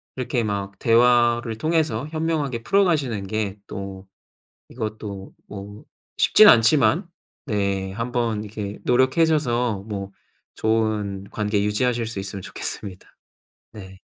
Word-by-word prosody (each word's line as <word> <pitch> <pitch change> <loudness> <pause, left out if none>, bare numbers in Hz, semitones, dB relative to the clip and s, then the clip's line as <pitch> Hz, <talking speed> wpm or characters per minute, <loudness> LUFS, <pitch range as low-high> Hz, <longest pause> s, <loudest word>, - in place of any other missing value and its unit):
이렇게 125 -2 -1
막 100 -2 -3
대화를 120 -1 +3
통해서 155 -3 0
현명하게 155 -7 -2
풀어가시는 145 - +1
게 105 -1 -2
또 95 -1 -7 0.6
이것도 105 -4 -6
뭐 100 +1 -9 0.3
쉽진 215 - +7
않지만 145 - +4 0.4
네. 100 -5 -1
한번 115 -1 -2
이렇게 105 -1 -6
노력하셔서 125 -5 +2
뭐 100 -2 -5 0.4
좋은 110 -3 0
관계 105 -1 0
유지하실 115 +3 0
수 110 -3 -5
있으면 100 0 -6
좋겠습니다. 95 0 -5 0.7
네. 95 -3 -11
110 Hz, 255 characters per minute, -23 LUFS, 100-125 Hz, 0.7 s, 쉽진